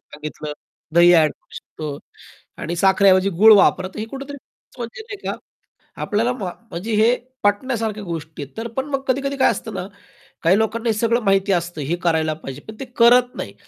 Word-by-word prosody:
सांगितलं. 150 0 -7 0.4
दही 175 +1 +7
ॲड 155 -3 +4
करू - - -21
शकतो. 155 -1 -7 0.7
आणि 170 +2 -4
साखरेऐवजी 190 +1 +4
गूळ 220 +1 +9
वापरा. 185 -1 +3
तर 190 - -12
हे 215 - -2
कुठेतरी 275 +4 -8
खरंच 260 - -23
म्हणजे 235 - -6
नाही 440 -2 -8
का - - -2 0.7
आपल्याला 230 +4 0
मा 190 -8 -5 0.2
म्हणजे 210 +6 -4
हे 225 +4 +4 0.3
पटण्यासारख्या 215 0 0
गोष्टी 160 -4 -6
आहेत. 140 - -13
तर 225 +1 -3
पण 265 - 0
मग 275 -1 -2
कधी-कधी 275 +2 -1
काय 260 - +4
असतं - - -6
ना, - - -4 0.6
काही 185 +4 +4
लोकांना 225 +2 -1
हे - - +3
सगळं 230 +2 +1
माहिती 195 0 +2
असतं 175 -3 -1
हे 175 - +1
करायला 160 -2 +1
पाहिजे. 140 -3 -9
पण 220 - -8
ते - - -3
करत 245 +1 +5
नाही. - - -6
205 Hz, 190 wpm, -21 LUFS, 170-235 Hz, 0.7 s, गूळ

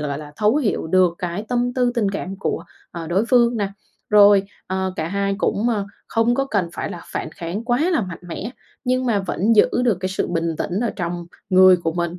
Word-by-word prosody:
gọi 145 -2 -3
là, 150 -1 -10
thấu 215 +5 +3
hiểu 235 - 0
được 180 0 +3
cái 180 +3 -3
tâm 245 0 0
tư 245 -1 +1
tình 210 -5 +1
cảm 195 -1 -5
của, 175 - -2 0.3
ờ, 170 -2 -6
đối 185 +7 +1
phương 240 -2 +4
nè, 205 -3 -1 0.4
rồi, 205 -1 +7 0.2
ờ, 190 0 -2
cả 160 - -2
hai 200 +1 -1
cũng, 220 +2 0
ờ, 205 -4 -1 0.2
không 230 +2 +2
có 275 - +1
cần 200 -9 0
phải - - -4
là 175 - -7
phản - - -3
kháng 185 +5 -4
quá 240 0 +1
là 330 - +2
mạnh 185 -5 -5
mẽ, 175 +6 -6 0.3
nhưng 255 +1 +1
mà 225 -4 +2
vẫn 200 +4 +1
giữ - - +6 0.2
được 230 -6 +2
cái 185 - -1
sự 190 - -2
bình 165 -1 -1
tĩnh 185 +4 -2
ở 235 -2 0
trong 175 -1 -4 0.2
người 185 0 +7
của 165 -2 -2
mình 175 +1 -3
195 Hz, 225 wpm, -21 LUFS, 175-230 Hz, 0.4 s, rồi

